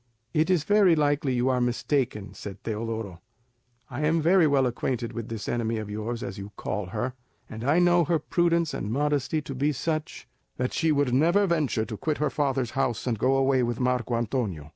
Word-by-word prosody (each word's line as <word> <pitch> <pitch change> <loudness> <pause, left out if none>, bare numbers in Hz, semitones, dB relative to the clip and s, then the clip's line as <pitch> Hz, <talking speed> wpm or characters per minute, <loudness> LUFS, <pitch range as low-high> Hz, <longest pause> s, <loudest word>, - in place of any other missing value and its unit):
"It 155 +3 +2
is 180 -5 +3
very 200 -3 +5
likely 145 -3 +1
you 125 +2 +1
are 125 -1 +1
mistaken," 120 -3 -1
said 100 -1 -9
Teodoro; 110 -4 -4 0.7
"I 130 +2 -5
am 160 +2 +2
very 170 +1 +4
well 140 -2 +3
acquainted 120 -1 -2
with 115 -1 -5
this 115 -2 -5
enemy 115 -1 -1
of 105 -1 -5
yours, 115 +3 -4
as 95 0 -6
you 100 +1 -8
call 105 -3 -3
her, 115 +7 -3 0.3
and 110 +1 -8
I 145 +6 +3
know 175 -1 +4
her 165 +2 +2
prudence 170 +1 +1
and 105 - -3
modesty 145 +2 0
to 140 - -6
be 140 +3 +1
such, 155 +3 -3 0.3
that 125 0 -1
she 160 -2 +2
never 145 +7 +3
would 200 - +1
venture 150 -9 +1
to 110 -2 -6
quit 155 +8 -1
her 150 - 0
father's 135 -5 0
house 125 -4 -1
and 115 -4 -1
go 130 +3 +3
away 135 -1 +3
with 120 -1 -1
Marco 125 -1 0
Antonio. 110 - -2
130 Hz, 200 wpm, -26 LUFS, 115-150 Hz, 0.7 s, very